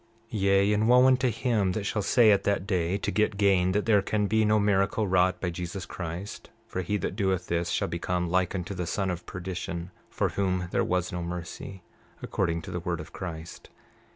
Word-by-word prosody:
29:7 105 Hz, -, -2 dB
Yea, 100 Hz, +1 st, +4 dB
and 110 Hz, +2 st, +2 dB
wo 125 Hz, +1 st, +7 dB
unto 130 Hz, -1 st, +4 dB
him 110 Hz, -5 st, 0 dB
that 105 Hz, -, -2 dB
shall 105 Hz, +1 st, -1 dB
say 110 Hz, +2 st, +5 dB
at 100 Hz, -, +3 dB
that 100 Hz, -2 st, 0 dB
day, 95 Hz, -2 st, 0 dB
to -, -, -2 dB
get 105 Hz, -1 st, +1 dB
gain, 95 Hz, -3 st, +3 dB
that 105 Hz, +2 st, 0 dB
there 105 Hz, -3 st, +4 dB
can 105 Hz, +1 st, 0 dB
be 110 Hz, +2 st, +2 dB
no 105 Hz, 0 st, +3 dB
miracle 100 Hz, +1 st, +2 dB
wrought 90 Hz, 0 st, +2 dB
by 90 Hz, -, -2 dB
Jesus 90 Hz, +2 st, -5 dB
Christ; 90 Hz, +3 st, -6 dB, 0.2 s
for 95 Hz, -, -4 dB
he 105 Hz, +4 st, -1 dB
that 95 Hz, -, -3 dB
doeth 95 Hz, -4 st, 0 dB
this 85 Hz, 0 st, -1 dB
shall -, -, 0 dB
become 90 Hz, +1 st, -2 dB
like 90 Hz, +2 st, +1 dB
unto 90 Hz, +1 st, -3 dB
the 90 Hz, -2 st, -4 dB
son 95 Hz, +1 st, -1 dB
of 90 Hz, 0 st, -6 dB
perdition, 90 Hz, -1 st, -5 dB, 0.2 s
for -, -, 0 dB
whom 90 Hz, -2 st, -1 dB
there -, -, +2 dB
was 90 Hz, -1 st, -1 dB
no 90 Hz, -, -3 dB
mercy, 85 Hz, +2 st, -6 dB, 0.4 s
according 85 Hz, -1 st, -1 dB
to -, -, -7 dB
the 90 Hz, -, -3 dB
word 85 Hz, -1 st, -3 dB
of 80 Hz, -, -9 dB
Christ! 80 Hz, -3 st, -7 dB
95 Hz, 210 wpm, -27 LUFS, 90-105 Hz, 0.4 s, wo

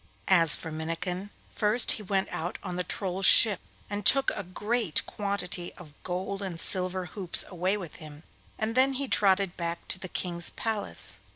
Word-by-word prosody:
As 165 Hz, -4 st, +8 dB
for 160 Hz, -, -7 dB
Minnikin, 170 Hz, +5 st, -5 dB, 0.2 s
first 215 Hz, +3 st, +2 dB
he -, -, -1 dB
went 195 Hz, -1 st, -2 dB
out 175 Hz, +2 st, -5 dB
on 180 Hz, -3 st, -5 dB
the 180 Hz, -, -2 dB
Troll's 190 Hz, 0 st, -1 dB
ship 210 Hz, -4 st, +5 dB, 0.3 s
and 205 Hz, 0 st, -5 dB
took 270 Hz, +6 st, +4 dB
a -, -, -5 dB
great 205 Hz, +1 st, -2 dB
quantity 200 Hz, -4 st, -4 dB
of 155 Hz, -5 st, -15 dB
gold 190 Hz, +2 st, -5 dB
and 185 Hz, -4 st, -5 dB
silver 185 Hz, 0 st, +6 dB
hoops 180 Hz, -1 st, +1 dB
away 185 Hz, +2 st, -2 dB
with 175 Hz, -6 st, -9 dB
him, 155 Hz, 0 st, -13 dB, 0.3 s
and 220 Hz, +1 st, -3 dB
then 260 Hz, +2 st, +3 dB
he 275 Hz, +1 st, -4 dB
trotted 195 Hz, -4 st, +2 dB
back 170 Hz, 0 st, -5 dB
to 185 Hz, -, +2 dB
the 185 Hz, -1 st, -8 dB
King's 170 Hz, -1 st, -2 dB
palace. 220 Hz, -2 st, -4 dB
185 Hz, 175 wpm, -27 LUFS, 175-205 Hz, 0.3 s, As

